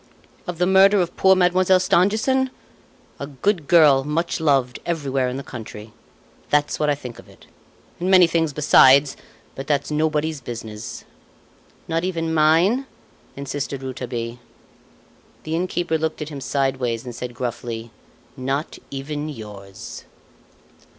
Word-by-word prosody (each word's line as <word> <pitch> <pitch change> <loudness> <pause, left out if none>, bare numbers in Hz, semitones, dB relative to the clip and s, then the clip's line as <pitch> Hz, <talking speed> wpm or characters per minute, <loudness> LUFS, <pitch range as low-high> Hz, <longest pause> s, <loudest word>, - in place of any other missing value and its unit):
"Of 180 -1 -4
the 180 - +2
murder 195 +2 +5
of 175 -1 -1
poor 190 0 +5
Mademoiselle 185 0 +3
Stangerson? 215 +9 +2 0.7
A 140 - -5
good 155 +3 -1
girl 150 -6 +6
much 160 +5 -1
loved 135 -6 +1
everywhere 140 -6 -1
in 125 - -4
the 140 - -6
country. 110 -3 -9 0.6
That's 145 0 +1
what 150 - +1
I 145 - +2
think 125 -4 -9
of - - -15
it - - -18 0.5
and 180 +2 -1
many 185 -2 +7
things 165 -2 0
besides; 140 -1 +5 0.4
but 135 - -8
that's 145 0 0
nobody's 155 -1 0
business." 110 -2 -7 0.8
"Not 165 +1 -1
even 165 -3 -2
mine?" 170 - +3 0.5
insisted 140 -1 -4
Rouletabille. 120 -2 -5 1.0
The 155 +1 -3
innkeeper 175 -2 -1
looked 160 0 -2
at 150 - -8
him 145 -3 -7
sideways 130 -4 -1
and 125 - -6
said 120 +1 -7
gruffly: 120 -1 -5 0.4
"Not 135 +4 -3
even 145 +2 -5
yours." 105 -7 -9
150 Hz, 135 wpm, -22 LUFS, 130-170 Hz, 1.0 s, many